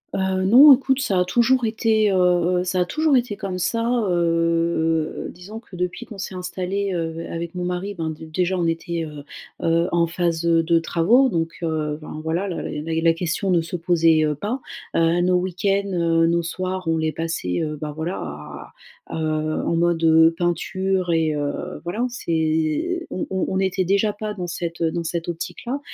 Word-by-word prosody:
Heu, 190 -1 0
non, 270 +8 +9
écoute, 265 +1 +1
ça 195 -8 +1
a 180 - +2
toujours 240 +5 +2
été, 220 -1 +2
heu, - - +1
heu, 180 0 +2
ça 185 0 -1
a 180 - +2
toujours 310 - +1
été 240 -4 +1
comme 185 -2 -4
ça, 230 +6 0
heu, 235 -3 +1
heu, 165 -1 +1
heu. - - -7
Disons 195 +6 -10
que 200 - -14
depuis 180 +6 -3
qu'on 210 -4 -10
s'est 190 - -5
installés, 185 +2 -3
heu, 165 0 -3
avec 170 +1 -5
mon 180 - -4
mari 180 +3 -3
ben, 165 -3 -3
dé 155 +1 -7
déjà 180 +4 -1
on 175 - 0
était, 165 0 -2
heu, 150 -2 -9 0.4
heu, 170 +1 +2
en 170 -1 +2
phase, 170 -1 -1
heu, 165 -1 +4
de 165 0 +3
travaux 215 +11 +3
donc, 165 -4 -2
heu, 155 -2 -2
ben 155 0 -7
voilà 170 +5 -1
la 180 - -4
la 155 +2 -4
la 165 0 +4
question 175 +3 -2
ne 170 -2 +3
se 170 +3 -6
posait, 165 -2 +3
heu, 150 - 0
pas. 215 - -3 0.4
Heu, 165 +1 +3
nos 180 0 +3
week-ends, 195 +2 0
heu, 165 -1 +2
nos 170 +1 +2
soirs 185 +1 -4
on 165 - +2
les 160 0 0
passait, 165 - -2
heu, 155 -1 -2
bah, 150 -1 -4
voilà 165 +4 -3
à 75 -1 -8 0.4
à 160 - -3
heu, 155 0 -1
en 170 - 0
mode, 170 0 +1
heu, 160 0 +6
peinture 180 +2 -1
et 160 -2 +2
heu, 145 -1 -4
voilà 185 +8 -2
on 250 - 0
s'est 165 - -1
on 185 - -3
on 190 -1 -1
on 190 - -1
n'était 190 0 0
déjà 200 +3 +2
pas 210 0 -5
dans 180 -3 -4
cette 170 0 -5
dans 165 +1 0
dans - - -3
cette 170 +1 -3
optique-là, 180 - -4
175 Hz, 205 wpm, -22 LUFS, 165-190 Hz, 0.4 s, non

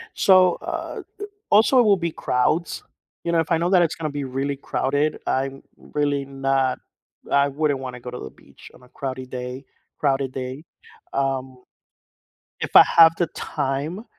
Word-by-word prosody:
So, 185 -2 +5
uh, - - -5 0.2
a - - -3 0.3
also 220 +5 +5
it - - +7
will 210 -3 +4
be 170 -3 -3
crowds, 155 +8 0 0.4
you 170 - -1
know, 165 - +3
if 165 - -4
I 165 - +3
know 170 +2 0
that 185 -2 +5
it's 165 - 0
gonna 155 -2 -3
be 145 0 -4
really 135 +2 -3
crowded, 145 +2 -1
I'm 135 +1 -2
really 145 -1 -2
not 135 -1 0 0.5
I 140 0 +3
wouldn't 145 -1 -1
wanna 125 -2 -7
go 125 - -7
to 125 - -7
the 65 - -8
beach - - -17
on - - -18
a 125 - -18
crowdy 130 0 -6
day 125 +1 -6 0.3
crowded 135 -2 0
day, 130 +3 -6 0.5
um. 130 -1 -2 1.0
If - - -5
I - - +11
have 165 -1 +9
the 175 - +2
time, 145 +9 -3
140 Hz, 175 wpm, -23 LUFS, 130-165 Hz, 1.0 s, I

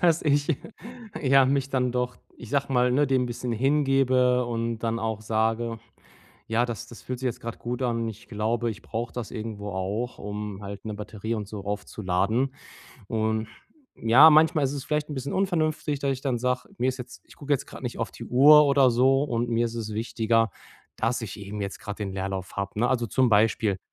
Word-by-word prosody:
dass 170 -2 +3
ich, 145 0 +2 0.7
ja, 135 0 +6
mich 135 0 +1
dann 125 -2 0
doch, 125 0 -1 0.2
ich 120 - -10
sage 140 0 0
mal, 125 0 +3
ne, 145 +3 +3
dem 130 -1 +2
‘n - - -1
bisschen 120 0 -4
hingebe 130 -1 +3
und 115 -1 -2
dann 115 0 -1
auch 110 -1 -2
sage: 115 +1 0 0.7
„Ja, 115 +2 +1
das 120 -3 -5
das 120 - -11
fühlt 125 -1 -5
sich 130 - -2
jetzt 120 - -2
gerade 115 -1 -6
gut 120 +2 -4
an.“ 115 -2 0
Ich 110 0 -10
glaube, 115 +2 -1
ich 100 - -8
brauche 115 +1 -4
das 120 -4 -5
irgendwo 110 -3 -5
auch, 100 +6 -3
um 105 0 -6
halt 100 +1 -7
'ne 110 - -4
Batterie 105 +1 -5
und 105 -2 -4
so 105 -2 -7
aufzuladen. 105 +5 -1 0.5
Und, 110 0 0 0.5
ja, 130 +8 +7
manchmal 155 -1 +5
ist 135 - 0
es 140 -2 -5
vielleicht 150 0 -1
‘n - - -3
bisschen 135 +1 -4
unvernünftig, 155 -6 0
dass 140 -1 0
ich 130 - -6
dann 130 -4 0
sage: 125 +1 -1
„Mir 125 - +1
ist 130 - -1
jetzt 125 0 -10
ich - - -17
gucke 145 0 -3
jetzt 140 - +1
gerade - - -11
nicht - - -4
auf - - -2
die - - -9
Uhr 150 +4 +7
oder 140 -2 +5
so 135 +3 +4
und 120 -4 -1
mir 115 0 +2
ist 115 - -6
es 110 -2 -4
wichtiger, 115 0 +1 0.5
dass 115 +2 0
ich 110 -3 -6
eben 100 +1 -6
jetzt 100 -1 -4
gerade 105 -1 -6
den 100 -2 -3
Leerlauf 95 -1 -4
habe“, 100 +1 -3
ne? 120 - +3
Also, 120 -2 +1
zum 130 +3 +2
Beispiel, 105 -2 +3
120 Hz, 210 wpm, -26 LUFS, 110-135 Hz, 0.7 s, ja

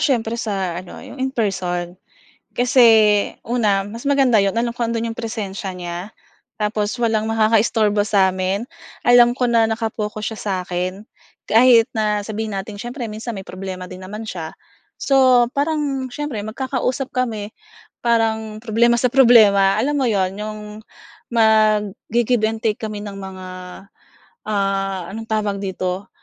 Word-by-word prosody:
siyempre 235 -4 +1
sa 190 -5 -2
ano, 185 - -11
yung 265 - -10
in 265 0 0
person. 180 -5 -2 0.6
Kasi 250 +1 +4 0.6
una, 215 -5 +1
mas 230 +6 -7
maganda 270 -5 +4
'yon 195 +2 0
alam 235 0 0
ko 240 - -6
ando'n 230 0 -2
'yong 225 - -9
presensiya 205 -4 -4
niya, 175 -1 -5 0.6
tapos 210 0 0
walang 220 -2 +1
makakaisturbo 215 -1 +2
samin, 190 0 +2 0.5
alam 240 0 +7
ko 250 - -1
na 230 -1 +4
naka-focus 215 -1 -3
siya - - -11
sa'kin. 180 -1 -2 0.6
Kahit 230 +1 +6
na 210 -1 0
sabihin 215 -1 -4
natin 200 +1 -6
siyempre 245 +3 -6
minsan 220 +1 -6
may 190 - -7
problema 185 0 -6
din 185 - -8
naman 210 +3 -7
siya. 165 -6 -6 0.5
So, 275 - +1 0.4
parang 285 -3 -1
siyempre 295 -7 -4
magkakausap 260 +2 -2
kami, 220 -5 -2 0.5
parang 220 -2 0
problema 235 +1 +3
sa 250 +1 +2
problema, 215 -7 +6
alam 290 +5 0
mo 260 - +1
'yon? 190 -4 +1
Yung 215 0 -5 0.7
mag-gi-give 220 +1 +2
and 220 0 -4
take 215 -2 0
kami 215 -2 -5
ng 200 -1 -7
mga, 190 -1 -8 1.0
ah, 195 -2 -1
anong 225 +2 -6
tawag 210 -2 -1
dito, 185 0 -4
215 Hz, 140 wpm, -20 LUFS, 195-235 Hz, 1.0 s, alam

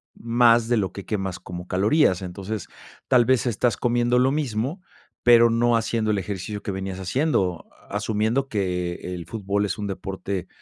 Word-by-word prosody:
más 115 0 +3
de 120 - +2
lo 95 -3 0
que 100 - -8
quemas 95 -4 -3
como 90 0 -8
calorías, 100 - +3
entonces, 95 +3 -5 0.4
tal 125 -2 +5
vez 130 0 +2
estás 120 -1 +1
comiendo 120 0 +2
lo 130 +2 +3
mismo, 140 - -2 0.4
pero 120 -1 +7
no 115 +1 +3
haciendo 110 -1 0
el 105 - +1
ejercicio 100 +2 -4
que 100 - -4
venías 95 0 -5
haciendo, 95 - 0 0.2
asumiendo 110 +5 0
que 90 -5 -1 0.2
el 85 -1 -7
fútbol 100 +2 -1
es 100 - -3
un 105 -1 -3
deporte, 95 -1 -4
105 Hz, 165 wpm, -24 LUFS, 95-120 Hz, 0.4 s, pero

